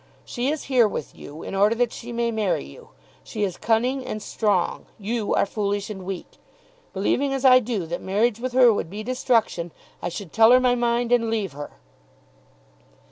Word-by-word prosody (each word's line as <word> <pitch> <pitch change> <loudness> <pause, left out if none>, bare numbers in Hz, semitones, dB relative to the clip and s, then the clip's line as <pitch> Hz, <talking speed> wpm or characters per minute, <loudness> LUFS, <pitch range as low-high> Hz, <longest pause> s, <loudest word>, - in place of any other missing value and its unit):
She 250 +2 -2
is 305 0 -2
here 250 -4 +3
with 155 - -5
you 150 +3 -10
in - - -6
order 205 +3 +3
that 240 0 +1
she 240 0 -8
may 235 0 -1
marry 210 - -1
you. 70 - -14 0.3
She 210 - -4
is 190 -4 -1
cunning 245 +4 0
and 215 - -5
strong. 205 -4 -1
You 215 +1 -2
are - - +3
foolish 205 0 -2
and 190 -3 -8
weak. 190 -2 -7 0.5
Believing 270 +8 0
as 270 0 -3
I 255 -1 +8
do 220 -7 -3
that 170 +2 -5
marriage 215 +4 +1
with 255 +1 -4
her 250 -3 +6
would 185 - -3
be 210 +4 -6
destruction, 230 -8 0 0.3
I - - -2
should 175 -1 -8
tell 225 0 +6
her 255 - +7
my 250 -1 +3
mind, 240 0 0
and 235 -2 +3
leave 215 -4 -1
her." 145 +1 -8
225 Hz, 190 wpm, -24 LUFS, 200-245 Hz, 0.5 s, I